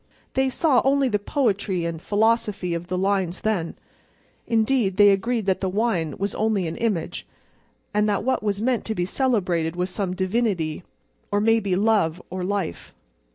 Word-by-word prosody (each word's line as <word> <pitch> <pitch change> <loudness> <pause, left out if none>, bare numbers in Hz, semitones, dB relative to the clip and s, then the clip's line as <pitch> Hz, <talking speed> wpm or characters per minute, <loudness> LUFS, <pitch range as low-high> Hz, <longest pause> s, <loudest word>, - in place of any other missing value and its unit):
They 265 0 +2
saw 265 -1 +3
only 275 0 +3
the 210 -2 +1
poetry 200 - 0
and 165 -1 -4
philosophy 210 -4 +1
of 170 +1 -4
the 185 - -2
lines 190 -2 0
then—indeed, 220 +3 -2
they 205 -1 +7
agreed 225 +3 0
that 190 -1 0
the 190 - 0
Wine 185 - -1
was 200 +1 -2
only 215 -4 0
an 160 - -4
image, 210 -8 -2 0.7
and 210 +1 +2
that 205 - 0
what 260 +3 0
was 205 -1 -1
meant 250 -1 +1
to 220 - -2
be 175 - 0
celebrated 180 -9 0
was 180 +1 -2
some 185 -1 -2
divinity, 185 -5 -1 0.5
or 205 - +2
maybe 215 -3 +2
Love 195 -5 +2
or 185 0 -3
Life. 195 - -3
200 Hz, 160 wpm, -24 LUFS, 180-225 Hz, 0.7 s, they